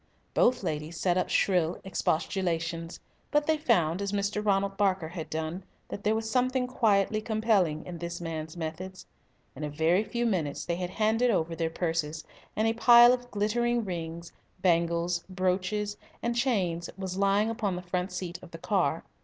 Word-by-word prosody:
Both 245 -3 +3
ladies 155 0 -3
set 180 -2 +2
up 185 - 0
shrill 175 -4 +2
expostulations, 165 -2 -1 0.3
but 295 0 +2
they 315 - +3
found, 175 - +2
as 200 -1 -2
Mr. 205 +1 -1
Ronald 195 -1 +1
Barker 190 -5 +1
had 165 -2 -6
done, 160 +4 -3 0.3
that 205 - -6
there 215 +1 +2
was 220 0 -2
something 255 +2 +1
quietly 215 -4 +2
compelling 215 -8 +1
in 175 -2 -7
this 170 0 -5
man's 160 -1 -5
methods. 175 +3 -6 0.5
In 145 - -7
a 150 - -2
very 160 +6 +2
few 240 +2 -2
minutes 170 -10 -1
they 170 - -1
had 180 -1 -3
handed 220 +5 +2
over 165 -6 0
their 165 -1 -1
purses, 160 -2 -2 0.3
and 215 +1 +2
a 225 - +2
pile 240 +1 +8
of 245 -1 -4
glittering 235 +3 0
rings, 170 -2 -5 0.3
bangles, 170 -1 +1
brooches, 185 +3 -1 0.3
and 235 0 0
chains 190 -10 0
was 190 -1 -4
lying 200 +3 +3
upon 215 -5 -1
the 180 - -6
front 180 +1 -2
seat 180 -1 -5
of 180 - -12
the 165 - -9
car. 165 -4 0
185 Hz, 170 wpm, -29 LUFS, 170-215 Hz, 0.5 s, pile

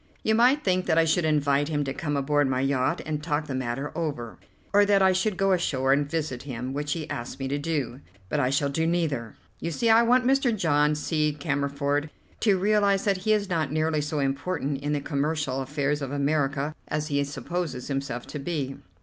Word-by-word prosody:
You 220 - +2
might 250 +6 +4
think 185 -1 +1
that 160 -2 +2
I 165 - +5
should 165 +1 +2
invite 145 -2 +2
him 150 -2 0
to 135 -1 -3
come 145 -1 -2
aboard 145 0 +2
my 130 -1 0
yacht 135 -1 0
and 150 -1 -3
talk 150 0 -1
the 140 - -5
matter 130 +2 -3
over, 145 -9 -4 0.3
or 205 0 +6
that 200 -1 +4
I 190 - +6
should 190 +1 0
go 195 0 +2
ashore 135 -7 +2
and 145 0 +1
visit 150 -6 -2
him, 130 -1 -5
which 145 +1 -2
he 160 -3 -5
asks 120 +1 -5
me 135 - -3
to 145 +1 -1
do; 145 -5 -2 0.3
but - - -1
I 125 - +2
shall 140 +1 +1
do 160 +3 0
neither. 150 -10 -1 0.2
You 165 - -3
see 225 +8 +2
I 225 +1 +7
want 245 +2 +3
Mr. 260 -3 +2
John 150 -4 +2
C. 150 0 0
Cammerford 140 +1 -1 0.3
to 205 -4 +3
realize 200 0 +2
that 200 -2 +2
he 215 +4 +1
is 205 -1 +1
not 160 -6 -1
nearly 155 0 +1
so 150 +1 -3
important 140 0 -1
in 145 +1 -1
the 145 - -1
commercial 145 -1 -1
affairs 145 +2 -1
of 135 -1 -4
America 145 0 0
as 150 +1 -2
he 140 -1 +1
supposes 145 -2 -4
himself 135 -4 -3
to 150 - -6
be." 140 -3 -3
150 Hz, 210 wpm, -26 LUFS, 140-175 Hz, 0.3 s, I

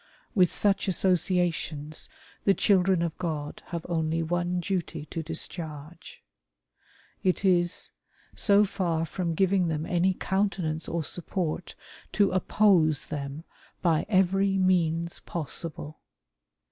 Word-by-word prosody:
With 180 -4 +4
such 205 0 +2
associations 175 -5 0 0.3
the 195 - +4
children 185 -3 +3
of 165 -2 -2
God 155 -4 -4
have 170 -2 -5
only 165 -1 0
one 175 +2 -1
duty 175 -4 -3
to 165 - -3
discharge. 160 -1 -7 1.0
It 185 +1 +1
is: 175 -2 +2 0.4
so 205 0 +4
for 170 -4 -1
from 165 +1 -3
giving 190 0 +2
them 155 -1 -2
any 180 +2 +1
countenance 185 -6 -1
or 170 -1 -1
support, 175 +1 -3 0.4
to 200 -2 +3
oppose 185 -5 +3
them 140 +1 -5 0.4
by 165 -3 +2
every 195 0 +3
means 170 -3 +1
possible. 155 -1 -5
175 Hz, 110 wpm, -27 LUFS, 160-185 Hz, 1.0 s, With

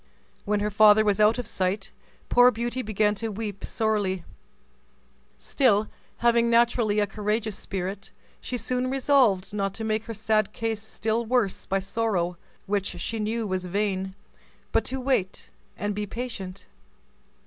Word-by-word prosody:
When 205 0 +1
her 210 0 -1
father 215 +1 +6
was 205 0 +2
out 215 +2 +5
of 245 - -3
sight, 195 +2 -2 0.4
poor 245 0 +6
Beauty 240 +2 -2
began 210 -2 +1
to 220 +2 -4
weep 205 -2 -5
sorely; 205 -5 0 1.1
still, 215 -6 +2 0.4
having 235 0 +4
naturally 235 -2 +3
a 205 - +3
courageous 210 +1 -2
spirit, 195 +1 -5 0.3
she 250 - -3
soon 255 +1 -1
resolved 255 -8 +2
not 195 -1 -1
to 225 - -5
make 220 0 -1
her 230 - -5
sad 215 -1 +1
case 225 -2 -2
still 220 +2 -2
worse 230 -4 0
by 195 - +1
sorrow, 195 -3 -1 0.3
which 200 -3 -2
she 225 +4 -3
knew 220 +2 -1
was 185 -2 -2
vain, 190 0 -1 0.6
but - - +2
to 265 - -3
wait 255 -8 -1 0.3
and 205 0 -2
be 210 +1 -3
patient. 200 -6 -6
215 Hz, 150 wpm, -26 LUFS, 195-230 Hz, 1.1 s, father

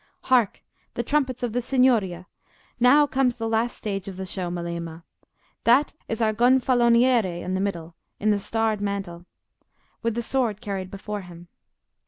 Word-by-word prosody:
"Hark! 245 -6 +2 0.3
the 240 - -1
trumpets 260 -2 0
of 235 -3 -1
the 245 - 0
Signoria: 230 -9 +2 0.5
now 270 +5 +6
comes 265 -3 +1
the 225 -1 -3
last 225 +2 0
stage 195 -3 -4
of 190 -2 -7
the 190 - -4
show, 185 -1 -4
Melema. 170 -1 -5 0.6
That 255 +6 +4 0.2
is 225 0 -1
our 215 -1 +2
Gonfaloniere 240 -5 +3
in 185 - -3
the 190 - 0
middle, 175 -4 -3 0.3
in 215 +1 +2
the 205 - +1
starred 220 0 0
mantle, 195 -4 -4 0.7
with 230 -2 -1
the 235 - -2
sword 230 -4 0
carried 195 -3 -4
before 205 +1 -6
him. 175 -1 -13
215 Hz, 160 wpm, -24 LUFS, 185-245 Hz, 0.7 s, now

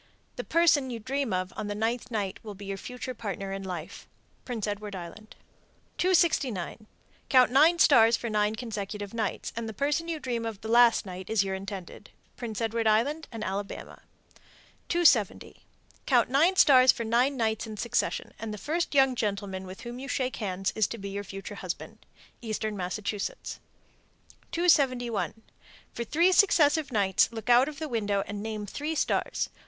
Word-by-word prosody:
The - - -4
person 315 -5 +3
you 240 - -4
dream 265 +2 -2
of 185 0 -2
on 215 - -4
the 205 - -3
ninth 230 +3 -2
night 205 -5 -3
will 210 -2 -8
be 200 +1 -10
your 195 0 -3
future 250 +4 -6
partner 195 -4 -5
in 195 - -4
life. 180 -4 -7 0.4
Prince 235 -5 -3
Edward 205 -1 -4
Island. 185 +5 -9 0.6
269. 275 - +1 0.4
Count 255 -3 +5
nine 310 +6 +5
stars 230 -8 +6
for 235 - -5
nine 210 -1 +1
consecutive 210 -3 -5
nights, 220 -4 -3
and 230 -1 -4
the 220 - -8
person 295 - 0
you 330 -2 -3
dream 240 -4 -3
of 225 -3 -5
the 220 - -6
last 235 -1 +5
night 185 -1 -8
is 220 -3 +3
your 195 -1 -3
intended. 190 -1 -7 0.3
Prince 225 -4 -5
Edward 225 0 0
Island 280 +9 +1
and 225 -2 -6
Alabama. 195 +1 -5 0.9
270. 295 - +2 0.4
Count 245 -3 +3
nine 325 +8 +4
stars 260 -7 +7
for 230 - -5
nine 245 +5 +2
nights 220 -1 -1
in 215 -1 -7
succession, 235 - -1
and 225 -1 -5
the 210 - -5
first 315 - -2
young 270 -1 +5
gentleman 200 -4 -3
with 190 +4 -9
whom 240 +1 -7
you 270 - -7
shake 260 -2 -2
hands 190 -2 -2
is 220 -3 +2
to 235 - -6
be 200 -2 -6
your 200 +1 -4
future 195 0 -8
husband. - - -7 0.4
Eastern 215 -2 -3
Massachusetts. 200 +2 -4 0.9
271. 245 - +1 0.5
For 235 - -3
three 335 +9 +3
successive 315 -6 +4
nights 200 -2 +2
look 230 +1 -2
out 250 +4 +6
of 300 - -10
the 315 +1 -4
window 205 -6 0
and 205 0 -6
name 215 -1 -4
three 295 +10 -4
stars. - - 0
225 Hz, 170 wpm, -28 LUFS, 205-260 Hz, 0.9 s, stars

